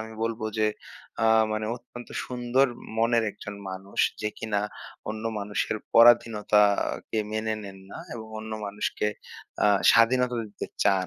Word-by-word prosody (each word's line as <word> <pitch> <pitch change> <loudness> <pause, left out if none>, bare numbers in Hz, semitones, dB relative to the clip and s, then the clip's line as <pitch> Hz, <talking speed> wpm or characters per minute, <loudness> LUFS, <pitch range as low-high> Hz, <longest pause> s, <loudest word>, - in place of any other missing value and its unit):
আমি 110 0 -7
বলব 115 0 -2 0.2
যে 110 - +3 0.6
আ - - +4 0.3
মানে 110 0 -2
অত্যন্ত 120 0 -12 0.2
সুন্দর 125 +2 +2 0.3
মনের 115 0 +3
একজন 105 0 -9 0.2
মানুষ 95 +1 -9 0.2
যে 105 - +1
কিনা 105 -2 -1 0.5
অন্য 110 +1 -4
মানুষের 105 +1 -2 0.2
পরাধীনতাকে 110 -3 +4
মেনে 110 0 -1
নেন 95 -1 -9
না - - -8 0.2
এবং 110 -2 -7
অন্য 110 0 -7
মানুষকে 105 +1 -2 0.6
আ - - +6 0.2
স্বাধীনতা 125 +1 +4
দিতে - - -6 0.2
চান। 95 -2 +3
110 Hz, 135 wpm, -27 LUFS, 105-115 Hz, 0.6 s, আ